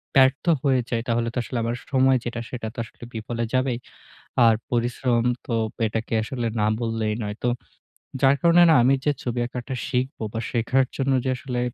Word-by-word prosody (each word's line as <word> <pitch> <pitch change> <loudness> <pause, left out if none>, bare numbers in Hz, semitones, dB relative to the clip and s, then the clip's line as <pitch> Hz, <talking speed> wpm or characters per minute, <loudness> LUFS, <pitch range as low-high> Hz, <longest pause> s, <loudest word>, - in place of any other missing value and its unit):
ব্যর্থ 135 +3 +4 0.2
হয়ে 130 -3 +3
যাই 115 -1 0
তাহলে 115 0 +1
তো - - -6
আসলে 125 - -5
আমার 115 +1 -1
স - - -17
সময় 130 0 +5
যেটা 120 -1 -3
সেটা 115 -3 -5
তো - - -6
আসলে 120 - -16
বিফলে 115 +1 -3
যাবেই। 130 -2 +1 0.7
আর 115 - +6 0.2
পরিশ্রম 120 0 +1 0.2
তো 120 - -3 0.3
এটাকে 115 +2 -3
আসলে 120 0 -4
না 105 - +2
বললেই 115 -2 -1
নয়। 105 0 -4
তো - - +2 0.7
যার 135 +1 +5
কারণে 170 +1 +6
না 160 - +6
আমি 135 +3 +5
যে 150 - +4
ছবি 120 -1 -2
আঁকাটা 125 +2 -5
শিখব 130 +3 -2
বা 115 - -2
শেখার 130 +3 +2
জন্য 135 0 +1
যে 130 - +1
আসলে 125 -2 -4
120 Hz, 190 wpm, -24 LUFS, 115-130 Hz, 0.7 s, আর